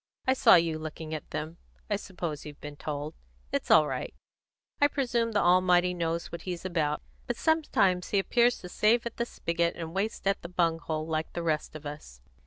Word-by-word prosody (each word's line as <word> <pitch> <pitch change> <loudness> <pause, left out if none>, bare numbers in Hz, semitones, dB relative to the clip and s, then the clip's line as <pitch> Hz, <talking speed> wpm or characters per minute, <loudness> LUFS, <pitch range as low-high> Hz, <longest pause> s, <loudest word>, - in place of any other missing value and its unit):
I 260 - +4
saw 260 - +7
you 165 -2 +2
looking 155 0 -6
at 155 - -6
them; 160 +2 -5 0.3
I 210 - +1
suppose 175 -6 -5
you've 150 -1 -10
been 145 0 -8
told; 145 0 -4 0.4
it's - - -2
all 155 - +7
right. - - -4 0.7
I 290 - +7
presume 240 -5 0
the 205 - +3
Almighty 180 0 +4
knows 170 -1 -2
what 170 - -6
He's 180 -1 -5
about; 155 -5 0 0.2
but 240 - -1
sometimes 245 - +2
He 205 - +1
appears 240 +5 +3
to 180 - -8
save 225 +6 +3
at 235 - -5
the 235 - -1
spigot 170 -4 -1
and 165 -1 -6
waste 200 +3 -2
at 195 0 +1
the 170 - -7
bung 170 -2 +1
hole, 155 -1 -3
like 160 0 -2
the 170 - -3
rest 155 -1 -1
of 155 -1 -9
us. 145 - -8
170 Hz, 200 wpm, -29 LUFS, 155-200 Hz, 0.7 s, saw